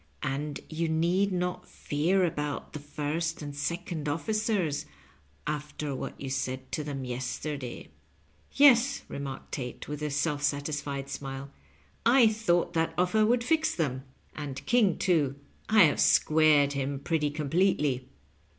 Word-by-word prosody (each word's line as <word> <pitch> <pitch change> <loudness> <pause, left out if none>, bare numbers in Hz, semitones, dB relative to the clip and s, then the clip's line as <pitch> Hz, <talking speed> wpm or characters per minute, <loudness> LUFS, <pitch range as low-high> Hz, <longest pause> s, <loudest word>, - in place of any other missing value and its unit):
And 145 +2 -3
yon 160 0 -1
need 185 +4 +2
not 180 0 -2
fear 175 +6 +1
about 150 -3 -3
the 150 - -5
first 150 +3 -3
and 145 -1 -6
second 165 0 -3
of&cers 200 -2 0 0.6
after 150 -1 -3
what 130 - -6
you 140 - -5
said 130 0 -3
to 155 - -2
them 140 -3 -4
yes 125 0 -3
terday." 140 -5 -6 0.3
" - - -36
Tes," 275 -1 +6
remarked 140 -1 -6
Tate, 125 -3 -5
with 150 0 -5
a 150 - -1
self 145 +1 0
satisfied 145 -1 -2
smile, 135 0 -6 0.3
" 70 - -35
I 240 +1 +6
thought 205 -6 +1
that 165 -1 0
offer 215 +5 +3
would 235 +1 +2
fix 315 +4 +1
them. 135 -6 -1 0.3
And 140 -3 -6
King, 225 -7 +3
too, 155 -8 +2 0.3
I 215 -2 +7
have 150 - +3
squared 155 -2 +5
him 140 0 -2
pretty 150 +1 0
completely." 150 -3 +1
150 Hz, 145 wpm, -29 LUFS, 140-180 Hz, 0.6 s, I